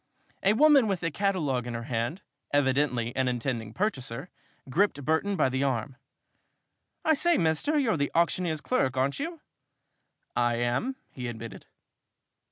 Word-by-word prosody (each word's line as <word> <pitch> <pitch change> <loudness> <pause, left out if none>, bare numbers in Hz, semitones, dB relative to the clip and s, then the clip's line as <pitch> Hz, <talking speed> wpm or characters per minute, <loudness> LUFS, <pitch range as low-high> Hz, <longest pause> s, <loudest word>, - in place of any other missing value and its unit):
A 200 - +4
woman 285 -1 +6
with 190 -3 -1
a 165 - 0
catalogue 150 - 0
in 120 - -4
her 115 - -4
hand 120 - -3 0.3
evidently 130 -4 +1
an 130 -1 +1
intending 120 -3 -2
purchaser 135 - -3 0.4
gripped 145 -1 +1
Burton 160 +6 +1
by - - +3
the 130 +1 -1
arm. 130 -1 -1 1.1
"I 315 - +5
say, 340 +2 +3
mister, 160 - +1
you're 235 - +2
the 145 0 0
auctioneer's 170 -2 +1
clerk, 130 - 0
aren't 135 +2 +1
you?" 325 +2 -4 0.9
"I 120 0 +2
am," 120 - -1 0.2
he 125 -2 -5
admitted. 115 -1 -8
145 Hz, 145 wpm, -28 LUFS, 125-200 Hz, 1.1 s, woman